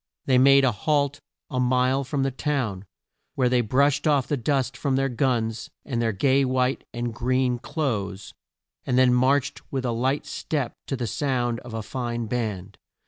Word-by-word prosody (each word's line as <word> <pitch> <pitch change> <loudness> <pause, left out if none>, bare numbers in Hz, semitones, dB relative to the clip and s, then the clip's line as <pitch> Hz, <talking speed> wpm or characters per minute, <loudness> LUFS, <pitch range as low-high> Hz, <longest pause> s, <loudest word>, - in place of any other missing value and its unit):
They 130 -1 +4
made 135 +1 +6
a 130 - +3
halt 145 +5 0 0.3
a 130 - -1
mile 130 +2 +2
from 135 +1 -2
the 135 - 0
town, 125 -9 -2 0.5
where 125 -2 +2
they 125 0 +3
brushed 140 +6 +2
off 145 -4 +3
the 145 - -1
dust 135 0 0
from 135 +2 -1
their 135 0 +1
guns, 120 -3 -1 0.2
and 120 -5 -2
their 115 -1 +1
gay 135 +7 +2
white 130 0 0
and 120 -1 -3
green 125 +1 0
clothes, 105 - -3 0.5
and 125 - 0
then 130 -1 +5
marched 130 +2 +2
with 130 -2 -2
a 120 - 0
light 130 +5 0
step 140 -6 -3
to 135 - -2
the 125 -2 -3
sound 120 0 -1
of 120 -1 -9
a 110 - -3
fine 120 0 -3
band. 110 -6 -4
130 Hz, 180 wpm, -25 LUFS, 120-135 Hz, 0.5 s, made